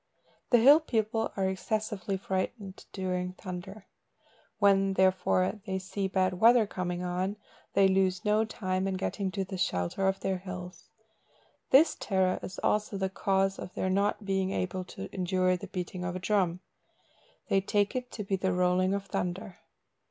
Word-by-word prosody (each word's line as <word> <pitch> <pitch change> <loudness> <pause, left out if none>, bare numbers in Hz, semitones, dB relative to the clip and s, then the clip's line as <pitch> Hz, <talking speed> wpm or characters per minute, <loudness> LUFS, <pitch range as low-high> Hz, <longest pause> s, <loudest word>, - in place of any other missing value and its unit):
The 245 - +6
hill 275 +7 +8
people 225 -6 -1
are 190 -1 +1
excessively 200 0 -2
frightened 190 +1 -4
during 180 -1 -2
thunder. 190 +3 -8 0.7
When, 195 -1 +4
therefore, 185 +1 +2
they 190 0 -1
see 190 +1 -3
bad 185 -1 0
weather 230 +1 +6
coming 180 -2 -3
on, 185 +3 -2 0.4
they 195 - +6
lose 190 +1 +1
no 210 +1 +3
time 190 -4 -2
in 190 - -1
getting 195 +1 -2
to 195 -1 -2
the 190 0 -6
shelter 90 - 0
of 190 0 0
their 190 -1 -1
hills. 180 -1 -8 0.8
This 305 +4 +6
terror 190 -2 +1
is 185 - -7
also 210 -1 +1
the 190 0 -1
cause 195 0 +1
of 180 - -8
their 185 - -1
not 200 +2 0
being 190 -1 0
able 185 -1 -2
to 95 - -8
endure 185 0 +1
the 200 +3 -7
beating 180 -1 -5
of 180 0 -3
a - - -3
drum. 185 -2 +1 0.9
They 195 - +3
take 205 +2 0
it 250 -1 -3
to 210 - -4
be 195 0 -1
the 190 0 0
rolling 180 +1 +2
of 200 0 -4
thunder. 185 +1 -4
190 Hz, 165 wpm, -29 LUFS, 185-200 Hz, 0.9 s, hill